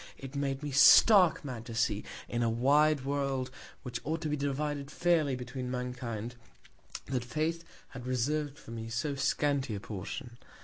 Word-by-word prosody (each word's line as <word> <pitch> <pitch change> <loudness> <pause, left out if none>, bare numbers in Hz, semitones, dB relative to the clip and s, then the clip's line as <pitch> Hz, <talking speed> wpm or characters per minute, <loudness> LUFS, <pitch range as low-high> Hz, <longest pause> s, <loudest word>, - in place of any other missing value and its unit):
It 135 +1 -9
made 140 0 -2
me 145 - -3
stark 170 +5 +7
mad 125 -5 -5
to 115 - -6
see, 110 -3 +1 0.2
in 120 - -2
a 115 - +2
wide 140 +4 +3
World, 135 -2 -1 0.3
which 120 -2 -4
ought 160 +2 -2
to 155 - -2
be 150 - 0
divided 145 0 -2
fairly 160 -4 +2
between 125 +1 -5
Mankind, 125 -2 -4 0.7
that 130 -3 -2
Fate 155 +6 -2 0.3
had 125 -2 -9
reserv'd 145 +3 -1
for 115 - -12
me 115 -1 -6
so 125 +6 -2
scanty 140 -2 0
a - - -4
Portion. 115 +5 -7
135 Hz, 165 wpm, -31 LUFS, 120-145 Hz, 0.7 s, stark